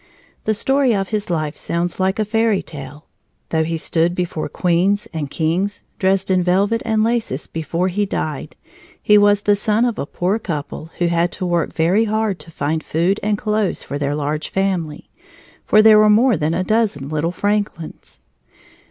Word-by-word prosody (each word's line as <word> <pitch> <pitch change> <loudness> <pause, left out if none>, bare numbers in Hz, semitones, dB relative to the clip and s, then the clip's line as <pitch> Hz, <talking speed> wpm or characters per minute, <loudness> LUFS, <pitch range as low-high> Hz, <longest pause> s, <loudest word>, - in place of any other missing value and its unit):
The 220 - +1
story 270 +1 +2
of 195 -1 -2
his 210 -3 -2
life 155 -3 -2
sounds 170 +2 -2
like 190 +1 +1
a 215 - 0
fairy 225 -1 +1
tale. 145 0 -9 0.4
Though 160 -1 +1
he 165 +1 -2
stood 165 +2 0
before 175 -3 -3
queens 190 +5 +1
and 150 -3 -3
kings, 175 +7 -1 0.2
dressed 190 0 +1
in 185 -1 +3
velvet 195 +6 +1
and 220 -1 +1
laces, 225 - -1
before 165 +3 -2
he 200 +2 -1
died, 155 -6 -4 0.4
he 210 - +4
was 205 0 +4
the 205 - +4
son 215 +3 +1
of 235 -3 -2
a - - -3
poor 190 +5 -1
couple 155 -4 -5
who 175 - +1
had 170 0 +1
to 185 - -4
work 175 -1 0
very 180 +7 +2
hard 215 -3 -1
to - - -10
find 155 0 -2
food 175 +6 0
and 210 0 0
clothes 210 -2 -1
for 145 - -5
their 145 0 -1
large 150 +1 -2
family 180 -6 -2 0.6
for 215 0 +5
there 215 -1 +7
were 215 0 +5
more 230 +3 +4
than 155 0 -1
a 185 - 0
dozen 210 -10 0
little 155 +3 -1
Franklins! 205 -4 -3
185 Hz, 180 wpm, -19 LUFS, 160-210 Hz, 0.6 s, there